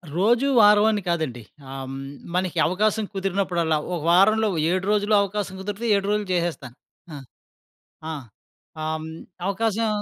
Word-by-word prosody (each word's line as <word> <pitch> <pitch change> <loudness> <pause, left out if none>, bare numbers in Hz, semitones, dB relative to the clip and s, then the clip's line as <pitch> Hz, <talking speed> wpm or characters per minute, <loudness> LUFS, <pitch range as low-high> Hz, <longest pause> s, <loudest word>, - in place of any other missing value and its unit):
రోజు, 235 +8 +3 0.2
వారవని 210 0 +5
కాదండి. 155 -8 -2 0.3
ఆహ్, 135 - -6
హ్మ్, 135 - -6 0.4
మనకి 185 -1 -1
అవకాశం 210 +4 0
కుదిరినప్పుడల్లా, 180 -4 0 0.2
ఒక - - -3
వారంలో 215 +5 +4 0.2
7 185 +1 -1
రోజులు 210 0 +2
అవకాశం 200 -1 -3
కుదిరితే, 205 +4 -5
7 200 0 -1
రోజులు 210 -1 -1
చేసేస్తాను. 165 -8 -2 0.4
ఆ! - - -6 1.0
ఆ! - - -3 0.7
ఆ‌హ్, 155 - -1
హ్మ్, 160 - -7 0.4
అవకాశం 220 +2 0
195 Hz, 130 wpm, -23 LUFS, 175-210 Hz, 1.0 s, వారవని